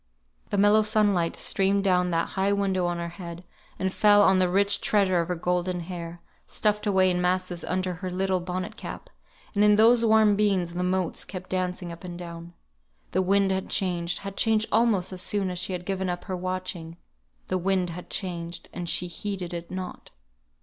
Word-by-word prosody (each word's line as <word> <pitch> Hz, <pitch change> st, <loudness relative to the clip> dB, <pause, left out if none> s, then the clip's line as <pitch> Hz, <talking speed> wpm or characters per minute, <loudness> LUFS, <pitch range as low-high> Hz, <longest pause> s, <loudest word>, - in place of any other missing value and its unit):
The 205 Hz, -, -1 dB
mellow 205 Hz, +2 st, +5 dB
sunlight 205 Hz, -6 st, +2 dB
streamed 195 Hz, +1 st, +1 dB
down 180 Hz, -2 st, +2 dB
that 165 Hz, -1 st, 0 dB
high 195 Hz, +1 st, 0 dB
window 190 Hz, -3 st, 0 dB
on 175 Hz, 0 st, -2 dB
her 170 Hz, 0 st, -4 dB
head, 170 Hz, -1 st, -9 dB, 0.3 s
and 190 Hz, 0 st, -1 dB
fell 205 Hz, -1 st, +5 dB
on 190 Hz, -1 st, +5 dB
the 185 Hz, -1 st, +3 dB
rich 200 Hz, +2 st, +3 dB
treasure 195 Hz, -4 st, +2 dB
of 170 Hz, -, -1 dB
her 180 Hz, -, -1 dB
golden 180 Hz, +1 st, -1 dB
hair, 170 Hz, -1 st, -7 dB, 0.2 s
stuffed 210 Hz, 0 st, 0 dB
away 190 Hz, -2 st, +4 dB
in 180 Hz, 0 st, 0 dB
masses 180 Hz, -1 st, -1 dB
under 185 Hz, 0 st, -1 dB
her 185 Hz, +2 st, -5 dB
little 185 Hz, +1 st, 0 dB
bonnet 180 Hz, +1 st, -5 dB
cap; -, -, -8 dB, 0.4 s
and 205 Hz, -1 st, +3 dB
in 210 Hz, 0 st, +6 dB
those 230 Hz, +2 st, +5 dB
warm 220 Hz, -2 st, +5 dB
beams 195 Hz, -5 st, +1 dB
the 180 Hz, -, -2 dB
motes 180 Hz, -1 st, -1 dB
kept 185 Hz, -1 st, -9 dB
dancing 180 Hz, -1 st, -2 dB
up 170 Hz, +1 st, -10 dB
and 175 Hz, -1 st, -7 dB
down. 170 Hz, 0 st, -9 dB, 0.6 s
The -, -, +1 dB
wind 195 Hz, +1 st, +2 dB
had 190 Hz, 0 st, -2 dB
changed 180 Hz, -2 st, 0 dB
had 195 Hz, -1 st, -5 dB
changed 220 Hz, -1 st, +2 dB
almost 215 Hz, -5 st, +2 dB
as 185 Hz, -, -5 dB
soon 195 Hz, -2 st, -1 dB
as 180 Hz, -, -3 dB
she 185 Hz, +1 st, -2 dB
had 180 Hz, -1 st, -5 dB
given 190 Hz, -1 st, -2 dB
up 175 Hz, 0 st, -3 dB
her 185 Hz, -, -4 dB
watching; 180 Hz, -2 st, -4 dB, 0.5 s
the 185 Hz, -, 0 dB
wind 185 Hz, -1 st, 0 dB
had 175 Hz, +2 st, -9 dB
changed, 170 Hz, -2 st, -5 dB
and 175 Hz, -2 st, -4 dB
she 180 Hz, -, +2 dB
heeded 180 Hz, 0 st, -5 dB
it 170 Hz, 0 st, -6 dB
not. 185 Hz, -1 st, -7 dB
185 Hz, 195 wpm, -26 LUFS, 175-200 Hz, 0.6 s, in